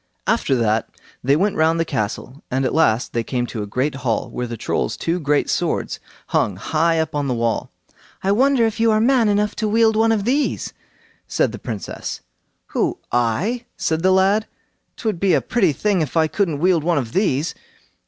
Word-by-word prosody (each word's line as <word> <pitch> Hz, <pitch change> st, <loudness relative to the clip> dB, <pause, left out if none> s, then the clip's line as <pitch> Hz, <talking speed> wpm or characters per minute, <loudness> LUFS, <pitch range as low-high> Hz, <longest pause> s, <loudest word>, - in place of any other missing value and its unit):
After 135 Hz, -, +1 dB
that 110 Hz, -2 st, +1 dB, 0.3 s
they 135 Hz, +3 st, +4 dB
went 195 Hz, +6 st, +1 dB
round 160 Hz, +1 st, +3 dB
the 165 Hz, -, +1 dB
castle, 130 Hz, +1 st, -4 dB
and 130 Hz, +1 st, 0 dB
at -, -, 0 dB
last 125 Hz, -7 st, +2 dB
they 115 Hz, -, 0 dB
came 120 Hz, 0 st, -2 dB
to 115 Hz, -2 st, -5 dB
a 105 Hz, -, -4 dB
great 130 Hz, +8 st, -1 dB
hall, 120 Hz, -5 st, -2 dB
where 125 Hz, -, -3 dB
the 115 Hz, 0 st, -6 dB
Trolls' -, -, -2 dB
two 170 Hz, +2 st, -1 dB
great 145 Hz, -2 st, +1 dB
swords -, -, -1 dB, 0.3 s
hung 100 Hz, -, +1 dB
high 160 Hz, -, +1 dB
up 160 Hz, -1 st, -1 dB
on 145 Hz, -1 st, -1 dB
the 125 Hz, -, 0 dB
wall. 115 Hz, -1 st, -1 dB, 0.5 s
"I 195 Hz, -, +2 dB
wonder 255 Hz, +2 st, +3 dB
if 225 Hz, -1 st, -2 dB
you 225 Hz, 0 st, +4 dB
are 215 Hz, -1 st, +3 dB
man 235 Hz, -1 st, +3 dB
enough 210 Hz, +1 st, +1 dB
to 220 Hz, -, 0 dB
wield 220 Hz, +1 st, +3 dB
one 225 Hz, +1 st, +3 dB
of 210 Hz, -3 st, 0 dB
these," 275 Hz, +5 st, 0 dB, 0.5 s
said -, -, +1 dB
the -, -, -8 dB
Princess. 110 Hz, -6 st, -5 dB, 0.5 s
"Who?—I?" 160 Hz, -, -1 dB
said 160 Hz, 0 st, 0 dB
the 185 Hz, -, +3 dB
lad. 195 Hz, +3 st, +3 dB, 0.5 s
"'Twould 215 Hz, -7 st, -2 dB
be 195 Hz, -1 st, +3 dB
a -, -, +3 dB
pretty 200 Hz, -8 st, +2 dB
thing 195 Hz, +4 st, 0 dB
if 155 Hz, +1 st, -2 dB
I 160 Hz, -, +5 dB
couldn't 165 Hz, -2 st, -1 dB
wield 170 Hz, 0 st, +2 dB
one 170 Hz, -1 st, +1 dB
of 120 Hz, -5 st, -3 dB
these." 165 Hz, -6 st, +1 dB
165 Hz, 195 wpm, -21 LUFS, 130-210 Hz, 0.5 s, I